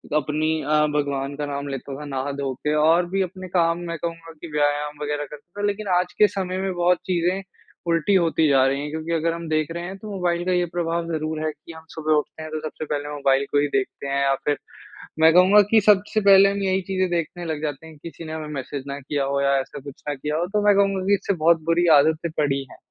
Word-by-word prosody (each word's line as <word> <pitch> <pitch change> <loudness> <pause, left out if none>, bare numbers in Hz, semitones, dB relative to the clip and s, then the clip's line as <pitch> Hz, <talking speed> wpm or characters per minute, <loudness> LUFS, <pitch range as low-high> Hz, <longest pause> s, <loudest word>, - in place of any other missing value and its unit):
अपनी 150 +1 0
अ, 150 +1 +2
भगवान 140 -1 -1
का 150 - -2
नाम 140 0 -4
लेता 135 0 -5
था 150 - -7
नहा-धो 140 0 -3
के 150 +4 -2
और 165 +3 +4
भी 195 +1 0
अपने 185 0 -5
काम 170 -1 +1
मैं 170 - -4
कहूँगा 165 0 -6
कि - - -7
व्यायाम 150 0 0
वग़ैरह 145 0 -2
करता 175 +7 -10
था - - +1
लेक़िन 205 0 -3
आज 180 0 -3
के 210 - +6
समय 185 -2 -3
में 190 0 -2
बहुत 175 0 +2
चीज़ें 180 +1 0 0.5
उल्टी 165 +4 +2
होती 165 -3 +3
जा 135 -1 +5
रही 135 +1 0
हैं। 150 - -4
क्योंकि 160 +1 -4
अगर 165 0 +1
हम 170 0 -6
देख 155 +1 0
रहे 170 +1 -5
हैं 190 +2 -6
तो 210 +2 -9
मोबाइल 175 -2 -1
का 185 - 0
ये 180 -1 +2
प्रभाव 170 -1 -1
ज़रूर 155 0 -2
है 155 - 0
कि 150 +2 -14
हम 160 0 -13
सुबह 155 -1 -1
उठते 150 +1 -1
हैं 155 - -8
तो 155 - -3
सबसे 155 0 -6
पहले 145 0 -3
मोबाइल 140 -1 +2
को 145 - +3
ही 145 - +2
देखते 135 +1 -4
हैं। 140 0 0
या 135 0 +3
फ़िर 145 -1 +1 0.6
मैं 160 +1 +6
कहूँगा 190 +4 +7
कि 220 -1 +6
सबसे 210 +1 +3
पहले 195 0 +7
हम 200 0 -3
यही 190 0 +1
चीज़ें 185 -1 0
देखने 175 +1 -2
लग 155 -2 -3
जाते 150 +1 -4
हैं 160 - -13
कि 165 +3 -8
किसी 165 - -11
ने 155 - -6
हमें 155 -1 -5
मैसेज़ 135 0 -5
ना 140 +1 -5
किया 140 +1 -2
हो 140 0 0
या 140 0 +3
ऐसा 135 - -6
कुछ 140 -2 -11
ना 145 - -2
किया 150 +3 -3
हो 170 - 0
तो 210 - +2
मैं 205 - +6
कहूँगा 195 -1 +2
कि 200 - +3
इससे 200 - -1
बहुत 165 -1 +3
बुरी 175 +1 +3
आदतें 160 +2 +1
पड़ी 140 -2 +1
हैं। - - -13
160 Hz, 250 wpm, -23 LUFS, 145-180 Hz, 0.6 s, कहूँगा